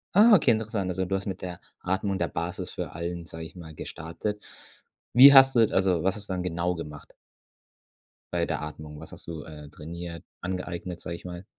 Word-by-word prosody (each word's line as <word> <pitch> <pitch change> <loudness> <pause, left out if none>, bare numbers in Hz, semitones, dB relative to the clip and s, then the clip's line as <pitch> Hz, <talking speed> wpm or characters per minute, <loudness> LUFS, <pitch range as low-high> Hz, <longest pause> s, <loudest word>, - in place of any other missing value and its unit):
Ah, 220 +3 +8
okay, 190 - +5
interessant. 110 -4 -1
Also, 95 +1 -1
du 95 +2 -1
hast 95 +1 -3
mit 95 - -4
der 90 -1 -5 0.2
Atmung, 95 +2 -1
der 85 -2 0
Basis 85 +2 -4
für - - -5
allen, 85 0 -4
sag 80 - -8
ich 80 - -10
mal, 80 -3 -10
gestartet. 105 +8 -5 0.7
Wie 135 +3 +10
hast 135 0 +8
du - - +5
also, 95 -3 +2
was 95 +2 +1
ist 105 0 -5
dann 90 -1 -1
genau 90 0 -1
gemacht? 75 -3 -8 1.3
Bei 85 -1 +1
der 75 -3 -2
Atmung- 75 0 -8
was 80 - -10
hast - - -3
du, 80 -3 -6
äh, 75 -1 -10
trainiert 85 +2 -8 0.2
angeeignet, 90 -1 -4
sag 85 - -5
ich 85 - -9
mal? 90 +1 -7
90 Hz, 195 wpm, -27 LUFS, 80-95 Hz, 1.3 s, Wie